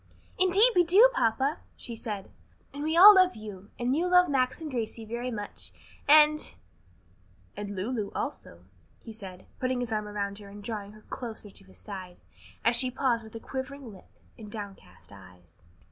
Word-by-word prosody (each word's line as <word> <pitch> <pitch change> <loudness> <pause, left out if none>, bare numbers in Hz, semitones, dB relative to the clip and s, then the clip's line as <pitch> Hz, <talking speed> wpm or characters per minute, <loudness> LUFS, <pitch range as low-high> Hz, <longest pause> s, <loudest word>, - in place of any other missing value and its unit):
"Yes, 370 - +5
indeed 410 +7 +5
we 355 - +6
do, 405 +9 +6
papa!" 270 - +1 0.2
she 235 - -6
said, 210 -4 -6 0.4
"And 285 +1 -5
we 315 +2 0
all 405 +4 +11
love 370 -5 +4
you, 205 -2 -10
and 245 +2 0
you 340 +4 +1
love 360 -1 +5
Max 255 0 +1
and 315 -2 -6
Gracie 230 -2 -4
very 235 +3 -4
much, 205 -4 -6 0.4
and 305 0 +5 0.5
" 90 +1 -33
"And 205 -1 -6
Lulu 210 +2 -3
also," 85 +1 -6 0.4
he 225 - -9
said, 190 -4 -10
putting 255 -1 -1
his 245 -2 -3
arm 215 -1 -2
about 200 -1 -4
her 200 -1 -12
and 205 +1 -11
drawing 205 -2 -5
her 215 0 -16
closer 220 -4 -7
to 195 - -10
his 190 - -15
side, 185 -4 -9 0.5
as 230 +1 +4
she 255 +1 +2
paused 250 -2 0
with 220 +1 -9
quivering 265 -1 -6
lip 190 - -16 0.3
and 215 -2 -9
downcast 200 - -10
eyes. 90 -3 -17
225 Hz, 180 wpm, -28 LUFS, 200-270 Hz, 0.5 s, all